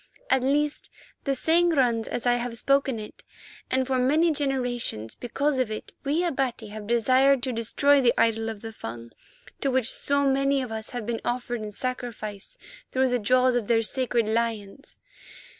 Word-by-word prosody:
At 260 - +4
least, 290 +3 0 0.4
the 275 -1 +1
saying 335 +4 +3
runs 235 -5 +2
as 240 - -4
I 245 - +4
have 240 -1 -4
spoken 275 -1 +1
it, 210 -1 -9 0.5
and 260 0 +1
for 260 0 0
many 305 +7 +3
generations, 245 - -2
because 275 +3 -1
of 255 -4 +1
it, 215 - -7
we 300 +5 +1
Abati 260 -9 -2
have 210 0 -8
desired 255 +3 +3
to 260 - -1
destroy 275 +5 +3
the 245 -2 +4
idol 225 0 +2
of 215 -2 -7
the 225 0 -7
Fung 115 - -8 0.5
to 275 - 0
which 260 -2 +2
so 280 0 +2
many 275 +1 +2
of 245 - -7
us 220 0 -4
have 245 -3 -5
been 230 0 -3
offered 240 -1 -2
in 215 - -5
sacrifice 230 - -5 0.3
through 260 0 +2
the 245 0 +1
jaws 255 +3 +3
of 240 -4 -1
their 225 -1 +3
sacred 240 -1 0
lions. 225 +1 -3
245 Hz, 175 wpm, -26 LUFS, 225-275 Hz, 0.5 s, At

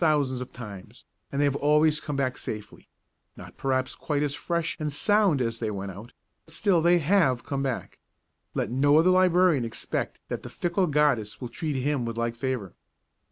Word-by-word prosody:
thousands 145 -6 +2
of 125 - -7
times, 100 -6 -10 0.3
and 140 - -2
they 145 - +4
have 140 -1 +1
always 150 +1 +3
come 145 - -5
back 130 -2 0
safely, 105 -1 -7 0.5
not - - -11
perhaps 130 -1 -1
quite 150 -1 -2
as 145 -1 0
fresh 170 +1 -2
and 150 -1 -2
sound 205 0 +3
as 115 -2 -1
they 110 - -1
went 100 -1 -4
out, 105 +6 -11 0.4
still 170 +2 +2
they 175 +2 +5
have 155 -7 +2
come 140 -1 -3
back; 135 -3 -3 0.6
let - - -1
no 145 +4 +4
other 170 +3 +5
librarian 180 -5 +4
expect 115 -1 -3
that - - -4
the - - -8
fickle 175 +2 0
goddess 140 -8 +1
will 125 - -5
treat 150 +4 -3
him 135 0 0
with 115 -1 -4
like 115 0 -1
favour. 120 -6 -3
140 Hz, 185 wpm, -27 LUFS, 120-160 Hz, 0.6 s, they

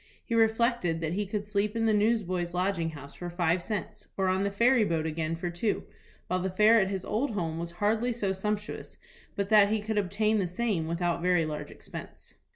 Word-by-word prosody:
He 235 - -4
reflected 225 -6 +2
that 160 0 -1
he 205 +2 -1
could 205 +1 -3
sleep 210 +1 -1
in 225 0 +1
the 220 - +3
Newsboys' 190 -5 +1
Lodging 180 -2 0
House 145 -3 -10
for 175 - -6
five 175 0 +1
cents, 210 +3 -5
or 190 -1 +2
on 190 +1 +1
the 200 - +1
ferry 235 +4 +4
boat 165 -5 0
again 160 0 -2
for 175 +1 -4
two, 190 +5 -1 0.4
while 185 - -1
the 190 - -1
fare 215 +5 +5
at 190 - +2
his 190 -2 -3
old 225 +2 -1
home 165 -4 -2
was 170 0 -5
hardly 220 +6 +1
so 210 -5 -1
sumptuous 210 +2 -4 0.4
but 200 0 -2
that 210 -2 +6
he 220 +1 +1
could 210 0 -1
obtain 210 +3 +1
the 185 - 0
same 180 -3 -1
without 170 0 -1
very 180 -2 +3
large 150 -1 -5
expense. - - -10
195 Hz, 210 wpm, -29 LUFS, 175-215 Hz, 0.4 s, that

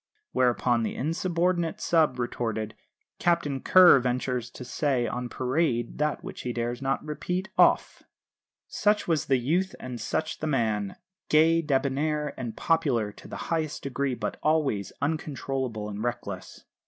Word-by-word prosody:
Whereupon 120 -1 +2
the 110 - -2
insubordinate 170 +2 0
sub. 155 -6 +2
retorted: 115 -3 -2 0.5
"Captain 170 -6 +1
Kerr 180 -2 +7
ventures 125 -1 -1
to 125 - -9
say 130 -1 0
on 125 +1 -3
parade 125 -2 -1
that 150 0 0
which - - -7
he 125 - -3
dares 120 +1 -3
not 135 +2 -1
repeat 180 +6 -3
off." - - +3 0.7
Such 210 0 +1
was 160 -3 +1
the 135 - +4
youth 170 +10 0
and 125 -3 -6
such 155 +7 -2
the 155 - -2
man 110 -8 0 0.3
gay, 165 +2 +5
debonair, 150 +1 0
and 120 -4 -6
popular 135 -11 +1
to - - -14
the - - -7 0.2
highest 160 -2 -2
degree, 135 -1 -1
but - - -4
always 145 -11 +1
uncontrollable 135 -7 -2
and 105 +1 -5
reckless. 120 -6 -5
135 Hz, 140 wpm, -27 LUFS, 120-155 Hz, 0.7 s, Kerr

